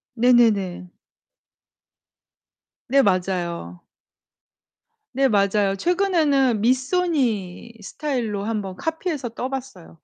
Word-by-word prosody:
네네네. 220 -7 +2 2.0
네. 275 +2 +4
맞아요. 175 - -2 1.3
네. 270 +1 +3
맞아요. 200 -2 +2
최근에는 300 - +1
미쏘니 250 - 0
스타일로 230 -5 -3
한번 205 -3 -3
카피해서 320 - -3
떠 245 +3 -5
봤어요. 255 - -8
230 Hz, 190 characters per minute, -22 LUFS, 195-270 Hz, 2.0 s, 네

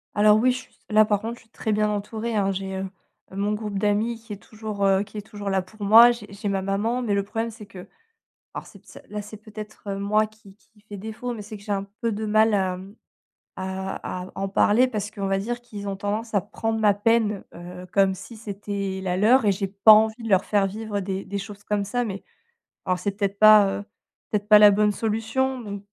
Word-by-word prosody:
Alors 210 0 +6
oui, 255 +3 +4
je 250 - -2
suis - - -16
s - - -30
là 215 0 +5
par 205 -1 0
contre, 230 +2 -4
je - - -18
suis 225 - -26
très 220 - -3
bien 210 0 +2
entourée, 215 +2 -3
hein. 195 -2 +1
J'ai, 190 0 -4
heu, 190 0 -4 0.4
mon 200 +2 -1
groupe 210 -1 -4
d'amis 215 +3 0
qui 225 -2 -9
est - - -7
toujours, 215 -2 -6
heu, 195 0 +3
qui 210 +1 -12
est - - -3
toujours 205 -2 -6
là 190 0 +2
pour 205 +3 -11
moi, 225 +4 +8
j'ai 235 -3 -6
j'ai 205 +1 -5
ma 195 -1 -1
maman, 215 +6 -1
mais 215 -4 0
le 200 - +2
problème, 225 +3 -3
c'est 215 -2 -12
que 185 -3 -11 0.7
alors - - -6
c'est - - -15
ps - - -16
là 210 0 -4
c'est 210 +1 -10
peut-être 215 -1 -8
moi 210 +2 +1
qui 210 -2 -19
qui 215 -1 -28
fait 205 -1 -10
défaut, 220 +4 -5
mais 220 - -7
c'est 210 +1 -9
que 200 - -16
j'ai 210 - -5
un 195 -1 -1 0.2
peu 230 - 0
de 215 +1 -3
mal 215 +1 +3
à, 190 -2 +1
hem, 190 +3 -10 0.6
à 190 -1 -4
à - - -9
en 195 0 -2
parler 210 +5 +3
parce 215 -3 -4
qu'on 200 -3 -4
va 195 0 +1
dire 240 +4 -3
qu'ils 205 -4 -7
ont 195 - -4
tendance 210 +3 -3
à 200 - +4
prendre 225 +2 -3
ma 210 -2 +4
peine, 210 -1 +1
heu, 180 +1 -9
comme 195 -1 +3
si 225 +4 -10
c'était 200 -2 -4
la 180 -1 -1
leur 230 +7 +5
et 205 - +4
j'ai 195 +1 -2
pas 200 +3 +6
envie 220 +2 +4
de 225 - -4
leur 190 -2 +3
faire 200 -2 +2
vivre 210 0 -4
des 190 0 -4
des 200 - -4
choses 200 0 -8
comme 205 -1 0
ça, 245 +5 -1
mais 200 -3 -6 0.6
alors 185 -1 0
c'est 200 +2 -3
peut-être 200 -1 -2
pas, 215 -2 +7
heu, - - -7 0.5
peut-être 205 -1 -2
pas 210 -1 +8
la 210 0 +9
bonne 210 +1 +3
solution. 225 +5 -1
Donc, 205 -3 -7
210 Hz, 245 wpm, -24 LUFS, 195-220 Hz, 0.7 s, la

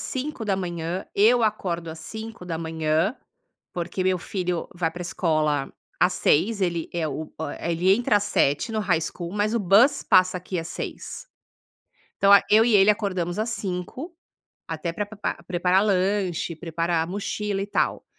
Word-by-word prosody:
5h00, 190 - -3
eu 230 +4 +5
acordo 180 -6 -1
às 160 0 -7
5h00, 165 - -2 0.6
porque 175 +2 -3
meu 185 -1 +2
filho 180 -1 -3
vai 175 -2 -1
para 175 +2 -7
escola 155 -5 0 0.3
às 180 +1 +4
6h00, 200 +9 +2
ele, 170 -3 -1
eh, 165 -2 -1
o 150 +2 -6
a 165 +1 -4
ele 180 +3 +3
entra 230 -1 +2
às 205 - +1
7h00 145 -2 +1
no 220 - 0
High 180 -6 +1
School, 170 +1 -5
mas 210 +2 0
o 235 - +1
bus 210 +9 +4
passa 185 0 +4
aqui 180 0 -5
às 165 - -4
6h00. - - -6 0.9
Então, 200 0 +5
a 200 - +8
eu 220 +2 +6
e 235 -2 +3
ele 200 +1 +7
acordamos 185 -4 -1
às 220 +2 -1
5h00, 215 - -5 0.5
até 165 +1 -3
pra 205 +4 -2
pepra 205 -4 -5
preparar 180 +2 +2
lanche, 190 -3 0
preparar 165 0 -1
mochila 205 +1 -3
e 200 - -3
tal. - - -1
185 Hz, 160 wpm, -24 LUFS, 170-205 Hz, 0.9 s, a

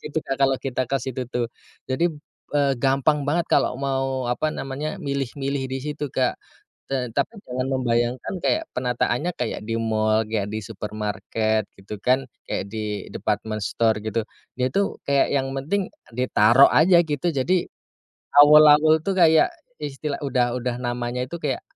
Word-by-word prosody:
gitu 150 +1 -2
Kak, 135 - -1
kalo 135 0 +4
kita 130 -1 -2
ke 135 - +2
situ 130 0 -4
tuh. 120 -1 -1 0.4
Jadi, 165 +6 +1 0.4
eee, 140 -2 +3
gampang 140 +2 +2
banget 170 +2 +1
kalo - - +3
mau 135 -2 -1
apa 150 +6 0
namanya 145 +7 -5
milih-milih 140 -1 -2
di 135 - -2
situ, 150 +1 -4
Kak. 130 -1 +1 0.5
Tetapi 130 - -1
jangan 130 +1 -2
membayangkan 120 +5 0
kayak 320 - +2
penataannya 125 +6 0
kayak - - -3
di 115 - -3
mall, 110 -1 +1
kayak 105 -2 -1
di 110 - -2
supermarket 110 +1 -2 0.2
gitu 105 +2 -7
kan, 130 +1 +2 0.2
kayak - - -2
di 105 -2 -4
department 110 +1 -2
store 110 +1 +1
gitu. 110 +1 -1 0.4
Dia 125 0 +2
tuh 200 0 -1
kayak 140 0 +3
yang 135 -1 +1
penting 180 +8 -1 0.2
ditaro 125 +1 +5
aja 170 +3 +6
gitu. 150 +2 -2
Jadi, 170 +7 +1 0.7
Awul-awul 150 +1 +7
tuh 195 - +1
kayak 160 - +5 0.3
istilah 145 0 -4
udah 125 -3 +1
udah 125 -1 -2
namanya 120 0 -3
itu 135 - -7
kayak 140 -3 -2
130 Hz, 150 wpm, -23 LUFS, 120-145 Hz, 0.7 s, Awul-awul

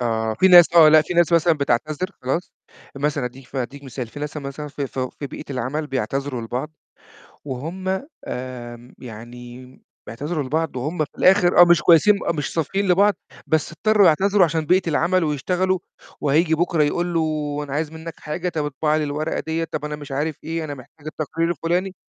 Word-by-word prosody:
آه، 110 -2 -1
في 190 +11 +4
ناس 175 -2 +9
آه، 160 -2 +8
لأ، 155 0 +7
في 175 - -5
ناس 175 -1 +3
مثلًا 170 0 +4
بتعتذر 150 +4 -1
خلاص، 135 +8 -2 0.4
مثلًا 145 -1 -1
أدّيك 125 +1 -8
ف - - -10
أدّيك 135 +3 -5
مثال، 130 -2 -6
في 145 +6 -11
ناس 150 +1 -5
مثلًا 145 +1 -6
في 140 -1 -4
فو 130 -1 -4
في 140 - -7
بيئة - - -9
العمل 135 +4 -3
بيعتذروا 135 0 -3
لبعض، 125 +7 -4 0.7
وهُم 160 +8 -5 0.4
آمم 125 -1 -7
يعني 120 +2 -10 0.4
بيعتذروا 145 +5 -4
لبعض، 160 +2 -2
وهُم 150 +8 -3
في - - -21
الآخر 185 -2 +5
آه، - - +11
مش 175 0 +4
كويّسين، 175 +5 +6
آه، - - +3
مش 150 -4 -4
صافيين 190 +5 -1
لبعض، 200 +3 +4 0.3
بس 160 0 0
اضطرّوا 205 +4 +3
يعتذروا 190 +4 +4
عشان 160 -2 -1
بيئة 180 0 +2
العمل، 170 +3 +2
ويشتغلوا 180 +6 0 0.4
وهييجي 155 +3 +2
بكرة 165 -1 +1
يقول 175 +4 0
له: 165 - +2 0.4
"أنا 140 - -9
عايز 155 +1 -2
مِنّك 160 0 -8
حاجة، 175 +4 -3
طَب 160 -4 -2
اطبع 150 +2 0
لي 155 - 0
الورقة 150 +2 -2
دِيَّة، 160 +1 -2
طَب 155 -2 -5
أنا 150 0 -4
مش 145 -2 -10
عارف 150 +3 -2
إيه 165 0 -3
أنا 145 -2 -5
محتاج 145 +3 -16
التقرير 160 +2 -2
الفلاني." 175 +3 -1
150 Hz, 185 wpm, -22 LUFS, 135-170 Hz, 0.7 s, آه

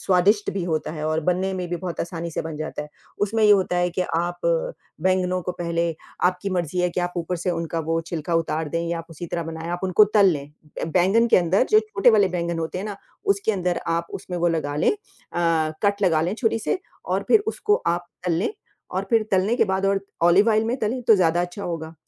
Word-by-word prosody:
स्वादिष्ट 195 +3 +3
भी 195 - -3
होता 160 -3 -1
है 155 -1 -5
और 155 0 0
बनने 180 +4 0
में 180 -1 -4
भी 175 - -2
बहुत 175 -1 -5
आसानी 170 0 -4
से - - -3
बन 160 -1 -6
जाता 155 -1 -4
है। 150 - -10 0.3
उसमें 220 +2 +1
ये 210 - +6
होता 190 -3 +4
है 175 0 +2
कि 180 +1 -1 0.2
आप 175 +1 -3 0.6
बैंगनों 185 0 +1
को 180 - -3
पहले, 170 -1 -1 0.3
आपकी 180 +2 +1
मर्ज़ी 180 -1 -2
है 180 0 +1
कि 180 - -2
आप 175 0 -2
ऊपर 175 +1 -2
से 175 +2 -1
उनका 165 -1 -2
वो 165 0 +1
छिलका 165 0 -3
उतार 160 -1 0
दें 165 +3 -1
या 170 0 -1
आप 165 - -8
उसी 165 +2 -7
तरह 170 0 -3
बनाएँ, 165 0 -6
आप 175 0 -3
उनको 190 +3 +6
तल 205 -2 +7
लें 140 -2 -5 0.3
अ, - - +1
बैंगन 190 +7 +3
के - - +6
अंदर 185 +6 +3
जो 430 - +7
छोटे 420 - +3
वाले 205 -4 +4
बैंगन 170 -2 -2
होते 165 +2 -3
हैं 195 - -4
ना 205 -2 -5 0.4
उसके 200 +2 -1
अंदर 180 -2 -1
आप 170 0 0
उसमें 180 -1 -5
वो 175 0 +2
लगा 155 -3 -1
लें 150 - +3
अ, 165 - -2
कट 200 0 +2
लगा 165 -4 +3
लें 180 +5 -1
छुरी 225 -1 0
से 225 - -1 0.3
और - - -1
फिर 440 - +6
उसको 425 -1 +1
आप 175 +1 0 0.2
तल 175 - +2
लें 180 - 0 0.4
और - - -2
फिर 225 -2 +4
तलने 190 +4 +2
के 230 - +4
बाद 190 0 -1
और 195 0 +2 0.2
ऑलिव 180 +6 +5
ऑइल 220 0 +3
में 235 +3 -1
तलें, 240 +4 -1
तो 225 - +6
ज़्यादा 175 -2 +3
अच्छा 175 +3 -4
होगा। 165 -2 -5
175 Hz, 240 wpm, -23 LUFS, 165-200 Hz, 0.6 s, तल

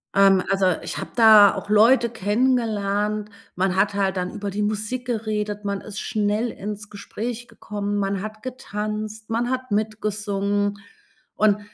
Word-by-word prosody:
Ähm, 195 -1 +5
also 195 -1 +2 0.2
ich - - -4
habe - - -6
da 215 -3 +8
auch 195 +1 -7
Leute 230 +3 +5
kennengelernt, 210 -2 0 0.3
man 185 0 0
hat 200 +1 +2
halt 195 -1 0
dann 180 0 -2
über 205 0 -4
die 205 +2 -2
Musik 215 +4 -2
geredet. 210 -3 -2
Man 200 -1 -1
ist 215 -1 -7
schnell 210 +2 0
ins 210 0 -6
Gespräch 230 +3 -6
gekommen. 205 0 -4
Man 195 -1 -1
hat 215 0 -7
getanzt, 215 -3 -5
man 235 +2 0
hat 255 0 -3
mitgesungen. 205 -1 -1 0.6
Und 210 -1 +3
210 Hz, 150 wpm, -23 LUFS, 200-220 Hz, 0.6 s, da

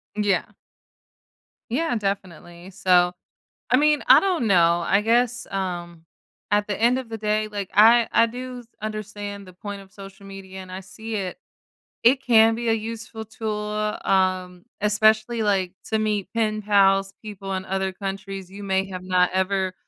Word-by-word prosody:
Yeah. 205 -4 +1 1.2
Yeah, 310 0 0
definitely, 185 -4 -5
so. 180 -1 +3 0.6
I - - +7
mean, 300 +1 +3
I - - +9
don't 355 - 0
know, 170 -2 +4
I 195 - +3
guess, 240 +2 +1
um, 175 -4 -4 0.5
at 205 0 +2
the 205 - -2
end 245 +3 +3
of 255 -3 -6
the 225 - -5
day, 215 0 0
like, 205 -2 -5
I 225 +3 +6
I 230 - +5
do 250 +2 -7
s 240 - -16 0.2
understand 205 -2 -6
the 185 - -13
point 200 +2 -7
of 190 -1 -16
social 195 0 -12
media, 190 -1 -9
and 185 0 -10
I 185 - -5
see 220 +4 -8
it. 190 -1 -3 0.6
It 260 +3 +5
can 225 -2 +5
be 235 0 -3
a 225 - +4
useful 225 0 -5
tool, 210 -1 -3
um, 185 -2 0 0.2
especially, 215 +2 +2
like, 195 -3 0 0.2
to 220 - +1
meet 210 -3 -1
pen 215 -2 0
pals, 195 -1 +3
people 200 -2 -7
in 190 0 -3
other 190 0 -1
countries 195 -1 -6
you 200 +1 -9
may 190 0 0
have 185 -1 -7
not 180 -1 +2
ever 190 0 0
205 Hz, 165 wpm, -23 LUFS, 190-220 Hz, 1.2 s, I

